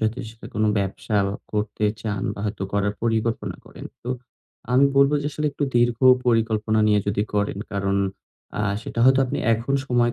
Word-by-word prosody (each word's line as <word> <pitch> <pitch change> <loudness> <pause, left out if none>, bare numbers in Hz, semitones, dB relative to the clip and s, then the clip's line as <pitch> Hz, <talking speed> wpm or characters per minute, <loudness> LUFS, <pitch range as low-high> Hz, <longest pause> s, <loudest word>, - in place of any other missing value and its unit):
যদি 110 +3 -1
সেটা 115 0 -12
কোন 110 - +1
ব্যবসা 100 +2 -2 0.4
করতে 105 0 -1 0.2
চান 100 -3 -2
বা - - -7
হয়তো 100 -2 -3
করার 100 0 +1
পরিকল্পনা 115 0 -1
করেন। - - -11 0.2
তো 125 - -4 0.6
আমি 135 +2 +6
বলব 140 +1 +6
যে, - - -2
আসলে 150 +1 -1
একটু 145 - -1
দীর্ঘ 120 -1 +3 0.3
পরিকল্পনা 110 -2 +2
নিয়ে 105 -1 +4
যদি 100 0 +1
করেন 100 -1 0
কারণ 100 0 0 0.6
আ - - 0 0.2
সেটা 115 - -7
হয়তো 130 +1 +6
আপনি - - -3 0.2
এখন 120 +5 -2
সময় 120 -2 +2
110 Hz, 170 wpm, -23 LUFS, 105-120 Hz, 0.6 s, আমি